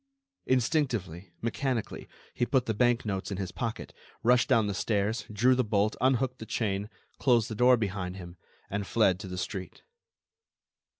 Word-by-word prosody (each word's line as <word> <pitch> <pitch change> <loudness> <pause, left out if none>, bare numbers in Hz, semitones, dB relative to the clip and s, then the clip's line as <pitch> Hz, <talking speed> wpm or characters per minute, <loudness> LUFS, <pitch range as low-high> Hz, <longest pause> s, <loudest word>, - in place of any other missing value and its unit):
Instinctively, 115 - 0
mechanically, 120 0 -2 0.3
he 120 - 0
put 130 -3 +2
the 110 - 0
bank 120 +2 +2
notes 100 -2 -3
in 100 - -4
his 95 -2 -4
pocket, 115 +1 -4 0.3
rushed 125 0 +4
down 110 -2 +4
the 100 - -1
stairs, 105 +2 -1
drew 120 +5 +4
the 130 0 +2
bolt, 105 -1 +1
unhooked 130 0 +1
the 110 - -8
chain, 100 -2 -1 0.3
closed 120 -4 +3
the - - -1
door 125 +3 +5
behind 95 -4 -3
him, 85 -2 -9 0.3
and 100 0 -3
fled 95 -5 +3
to 95 - -7
the 90 0 -6
street. 95 +1 -5
110 Hz, 165 wpm, -29 LUFS, 100-125 Hz, 0.3 s, door